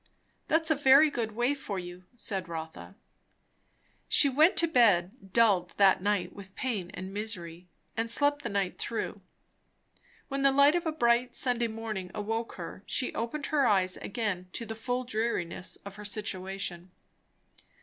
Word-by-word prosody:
"That's 320 0 +3
a - - +4
very 285 +2 +6
good 225 -5 -3
way, 240 +5 +1
for 245 -8 -5
you," 180 0 -8
said 195 -6 -4
Rotha. 160 -1 -7 1.1
She 285 - +6
went 310 +7 +4
to 335 - +6
bed, 205 - +2
dulled 195 -7 +3
that 195 -2 +5
night 200 -3 -1
with 195 -1 -12
pain 215 -9 -3
and 190 +1 -7
misery, 180 -5 -6 0.3
and 225 0 -1
slept 290 +4 +3
the - - -4
night 200 -2 -2
through. 230 - -4 1.1
When 275 0 -3
the 275 0 +5
light 280 +2 +5
of 345 -1 -1
a - - +1
bright 240 -4 +1
Sunday 240 -2 +2
morning 220 -4 -5
awoke 225 +2 -3
her, 175 +1 -8
she 255 - -1
opened 255 +5 -3
her 280 -4 +4
eyes 185 -3 +3
again 200 -5 -4
to 230 - -4
the 225 - -5
full 245 +3 -3
dreariness 220 -7 -2
of 200 0 -9
her 210 - -9
situation. 190 -3 -4
220 Hz, 160 wpm, -29 LUFS, 190-255 Hz, 1.1 s, very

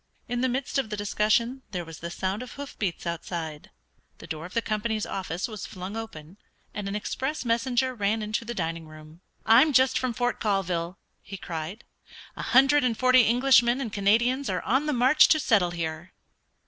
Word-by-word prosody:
In 245 -1 -2
the 260 - +2
midst 265 +2 -1
of 250 -5 -2
the 210 - -4
discussion 215 +5 +1
there 175 -2 -3
was 165 -1 -10
the 170 - -5
sound 190 +4 -3
of 255 - -8
hoof 285 0 -8
beats 185 -5 -3
outside, 165 -2 -5 0.5
the - - -12
door 160 0 -6
of 180 - -16
the 230 - +2
company's 215 0 -1
office 185 -1 -4
was 215 -4 -7
flung 185 +3 -7
open, 195 -6 -8 0.4
and 205 -1 -4
an 200 - -3
express 265 +7 -3
messenger 240 +2 +1
ran 215 -1 -1
into 215 +2 -2
the 240 +1 -6
dining 165 -2 -3
room. 155 +2 -14 0.2
"I'm 255 +7 +6
just 260 0 +4
from 255 -2 -1
Fort 245 +1 -1
Colville!" 185 -4 -1 0.2
he 195 - -9
cried. 170 +5 -6 0.5
"A - - -6
hundred 275 +3 +4
and 235 -3 0
forty 255 -2 +5
Englishmen 245 0 +4
and 235 -6 -4
Canadians 235 +7 +2
are - - -2
on 270 +5 +1
the 300 - +1
march 255 +4 +5
to 310 - +4
settle 205 -10 +2
here!" 165 0 -5
215 Hz, 190 wpm, -26 LUFS, 180-250 Hz, 0.5 s, I'm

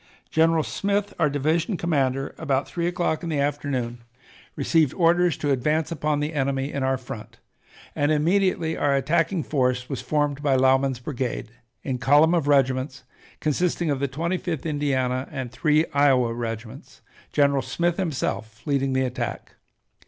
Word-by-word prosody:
General 160 0 +3
Smith, 200 +4 -1
our 155 -3 +3
division 155 - 0
commander, 135 -5 0
about 140 -3 0
three 170 -1 -2
o'clock 175 -3 -1
in 170 - -4
the 150 -3 -1
afternoon 140 -4 -2 0.6
received 155 0 +2
orders 175 0 +3
to 145 - -1
advance 150 +5 0
upon 150 -2 0
the 150 +2 -2
enemy 135 -1 -1
in 140 - -2
our 130 0 +1
front, 120 -4 -9 0.6
and 145 +1 +1
immediately 165 +1 +1
our 140 -1 +1
attacking 165 +5 +1
force 125 -3 0
was 135 -4 -3
formed 145 -2 -1
by 140 -2 +2
Lauman's 130 0 +3
brigade, 125 -3 -4 0.3
in 130 -3 -3
column 145 +6 +5
of 165 -5 +1
regiments, 135 -1 +1 0.4
consisting 165 +1 0
of 140 - -1
the 140 - 0
Twenty 165 +7 -2
fifth 165 -6 -4
Indiana, 135 -4 0
and 130 -3 -5
three 155 +3 +2
Iowa 130 -5 +3
regiments, 115 -1 -7 0.3
General 140 -1 +3
Smith 175 +3 -1
himself 130 - -3
leading 135 -2 0
the 130 0 +2
attack. 125 -1 -4
145 Hz, 150 wpm, -24 LUFS, 130-160 Hz, 0.6 s, column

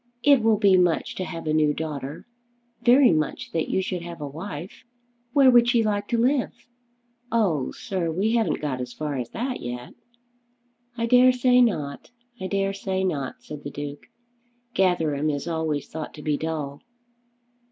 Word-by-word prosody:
It 280 -3 +6
will 220 -1 +3
be 200 -3 +5
much 175 -3 +1
to 185 - -4
have 165 -3 -7
a 155 - 0
new 150 -1 +3
daughter; 150 -1 -5 0.6
very 250 +1 +6
much 155 -2 -1
that 165 -1 -1
you 190 - +1
should 180 -1 -3
have 170 -1 -8
a 145 - -4
wife. 160 +3 -8 0.5
Where 270 -2 +6
would 240 -1 +5
she 235 -1 +3
like 205 -1 -1
to 235 - 0
live?" 255 +3 +2 0.8
"Oh, 180 - +1
sir, 185 -6 -3
we 195 +7 0
haven't 230 -2 +1
got 135 -4 -2
as 125 -1 -6
far 150 -2 -4
as 120 - -4
that 250 +2 -3
yet." 120 0 -6 1.0
"I 230 - 0
dare 250 +2 +6
say 250 0 +4
not; 150 -12 -1 0.3
I 185 - -3
dare 195 0 0
say 190 -1 -2
not," 140 -8 -3
said 150 -1 -9
the 145 - -5
Duke. 145 0 -7 0.7
"Gatherum 160 -6 +1
is 145 +2 -3
always 160 -4 -2
thought 160 -1 -7
to 150 - -10
be 150 0 +1
dull." 145 -2 -4
170 Hz, 175 wpm, -25 LUFS, 150-220 Hz, 1.0 s, It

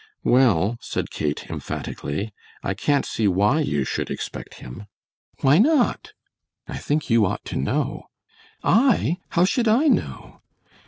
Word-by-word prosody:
"Well," 115 -4 +3
said - - -4
Kate, 75 -1 -3
emphatically, 100 +9 -5 0.3
"I 95 - -1
can't 140 +8 +1
see 110 - 0
why 105 - +3
you 75 - 0
should - - -3
expect - - -6
him." 95 - -10 0.5
"Why 140 +5 +5
not?" 280 +2 +2 0.5
"I - - -6
think 150 -3 -1
you 115 -1 +5
ought - - -4
to - - -6
know." 70 - -2 0.6
"I, 225 - +3
how 175 - +3
should 230 +5 +1
I 235 +8 +4
know?" 300 - -1
130 Hz, 140 wpm, -23 LUFS, -, 0.6 s, Why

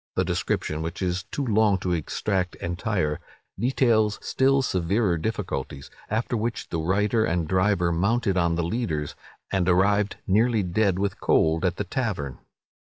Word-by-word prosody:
The - - +1
description, 75 +1 -1
which 85 +4 -4
is 90 0 -1
too 140 - -3
long 110 -3 +3
to 90 - -1
extract 90 +3 -1
entire, 85 -3 -2 0.4
details 115 -4 +2
still 135 +1 +2
severer 95 -1 +1
difficulties; 80 -8 -4 0.2
after 110 +3 -1
which 115 0 -3
the 85 - -2
writer 105 +6 +1
and 85 -5 0
driver 95 -1 +2
mounted 100 +4 +1
on 85 -2 +2
the 85 - 0
leaders, 85 -7 -2 0.4
and 95 -2 +1
arrived, 100 +3 +3
nearly 110 +2 +2
dead 95 +1 +1
with 100 0 -2
cold, 80 +1 +2
at 90 -1 +1
the 105 - -2
tavern. 95 - -3
95 Hz, 150 wpm, -25 LUFS, 85-110 Hz, 0.4 s, long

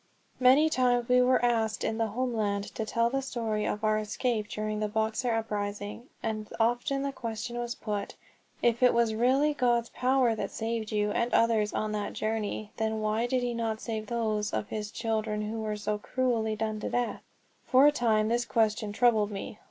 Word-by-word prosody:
MANY 260 +5 +6
times 245 -3 +2
we 250 0 +5
were 250 0 +3
asked 225 -2 +1
in 220 - -1
the 225 - +2
homeland 215 -3 -2
to 220 - -4
tell 230 +1 +1
the 270 0 0
story 225 -5 -2
of 210 - -3
our 215 0 +2
escape 215 +1 -1
during 215 0 -3
the 215 - 0
Boxer 220 +3 0
uprising, 210 +1 -3
and 215 -1 -3
often 245 +4 +1
the 280 - -1
question 230 -2 -5
was 240 0 -3
put, 210 -2 -4 0.5
"If 235 0 +2
it 250 -1 +5
was 235 -2 +3
really 265 +6 +3
God's 240 -4 +1
power 255 -2 +2
that 220 - -3
saved 225 -1 -3
you 210 -1 +1
and 235 +3 0
others 220 -3 +3
on 215 0 -2
that 210 -1 -3
journey, 215 -1 -3
then 220 0 -1
why 215 +2 0
did 255 0 0
he 245 -1 -1
not 225 -2 -2
save 220 -2 -4
those 215 -3 -1
of 210 - -2
his 210 -1 -4
children 220 -2 -2
who 220 +1 -4
were 215 -1 -2
so 210 0 -2
cruelly 230 -2 0
done 215 0 -2
to - - -3
death?" 245 -1 -1 0.5
For 260 +2 +6
a 295 - +7
time 220 -6 +2
this 240 +2 +1
question 220 -2 0
troubled 220 -3 +3
me. 205 +1 -6
225 Hz, 190 wpm, -29 LUFS, 215-240 Hz, 0.5 s, a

